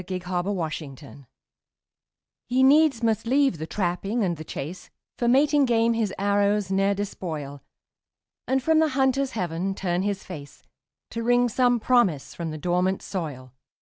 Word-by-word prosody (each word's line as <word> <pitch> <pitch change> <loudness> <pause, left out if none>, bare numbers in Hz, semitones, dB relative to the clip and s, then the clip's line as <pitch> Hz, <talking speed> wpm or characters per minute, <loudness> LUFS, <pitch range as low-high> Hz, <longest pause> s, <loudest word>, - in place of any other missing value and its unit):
THE 185 +1 -5
INDIAN 180 - -4 0.2
CORN 200 +2 -2 0.4
PLANTER 140 -1 -14 1.2
He 255 +2 +2
needs 280 -3 +4
must 225 0 0
leave 270 - +2
the 160 - -5
trapping 195 +5 -1
and 175 -3 0
the 155 - -8
chase, 165 +4 -7 0.3
For 240 - +1
mating 285 +3 +4
game 230 -1 +2
his 225 -4 -1
arrows 200 0 +1
ne'er 195 +1 +2
despoil, 155 -8 -5 0.9
And 265 0 +1
from 320 +1 +3
the 320 -1 +3
hunter's 265 0 +1
heaven 180 -1 -2
turn 180 -2 -1
his 200 -1 -2
face, 145 -6 -10 0.5
To 230 - -4
wring 245 +1 +3
some 245 +1 +2
promise 215 - +1
from 170 -1 -5
the 155 - -5
dormant 180 +4 0
soil. 140 -9 -6
200 Hz, 155 wpm, -25 LUFS, 175-245 Hz, 1.2 s, needs